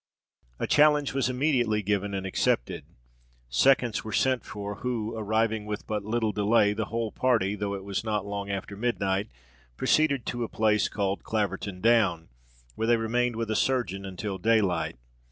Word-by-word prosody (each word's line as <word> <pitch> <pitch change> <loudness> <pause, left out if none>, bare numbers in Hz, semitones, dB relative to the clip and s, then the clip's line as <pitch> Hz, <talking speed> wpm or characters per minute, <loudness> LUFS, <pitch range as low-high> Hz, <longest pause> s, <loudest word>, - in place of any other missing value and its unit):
A - - -2
challenge 150 -1 +4
was 135 -2 +1
immediately 125 -5 +1
given 100 0 -1
and 95 0 -3
accepted. 90 -9 0 0.6
Seconds 120 - +3
were 110 - -6
sent 130 +3 +1
for, 105 0 -6
who, 115 -3 -3
arriving 110 0 0
with 105 0 -4
but 105 -1 -3
little 110 +1 0
delay, 105 0 +3
the 110 +1 -2
whole 115 0 -3
party, 115 -6 +1
though 100 -1 -3
it 95 - -7
was 100 +1 -3
not 105 -3 -1
long 100 0 -4
after 100 +1 -4
midnight, 100 -2 -1 0.5
proceeded 140 -5 +2
to 120 -1 -2
a 115 - -4
place 105 -2 +2
called 100 -1 -2
Claverton 100 -3 -2
Down, 105 -8 +3 0.4
where 110 - -2
they 120 0 +4
remained 120 +1 0
with 115 -1 -2
a - - 0
surgeon 110 -7 0
until 95 +1 -5
daylight. 95 - +1
110 Hz, 165 wpm, -27 LUFS, 100-120 Hz, 0.6 s, challenge